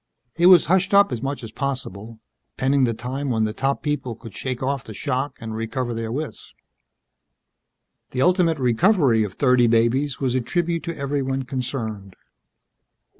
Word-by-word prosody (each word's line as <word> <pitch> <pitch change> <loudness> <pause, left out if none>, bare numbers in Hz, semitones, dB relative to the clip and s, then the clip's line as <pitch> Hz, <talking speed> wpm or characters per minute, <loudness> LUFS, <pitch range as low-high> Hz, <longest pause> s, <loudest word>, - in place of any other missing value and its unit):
It 175 +1 +4
was 180 -1 +8
hushed 190 +3 +2
up 200 -4 +6
as 120 - -3
much 135 -1 -4
as 115 - -7
possible, 115 -6 -4 0.4
pending 135 0 +2
the 115 - 0
time 130 +5 -4
when 110 -3 +1
the 110 0 -1
top 135 +4 -1
people 140 -6 -2
could 115 -2 -12
shake 130 +5 -4
off 135 -1 -1
the 110 - -10
shock 140 +2 -2
and 110 -1 -6
recover 115 +2 -3
their 115 -1 -4
wits. 150 +4 -6 1.5
The 130 - 0
ultimate 180 -3 +3
recovery 130 - +3
of 105 - -4
thirty 125 -3 +4
babies 120 +5 +1
was 130 -3 0
a 130 - +1
tribute 170 +5 -1
to 170 -1 -4
everyone 135 -1 -2
concerned. 120 -7 -5
130 Hz, 165 wpm, -23 LUFS, 115-145 Hz, 1.5 s, was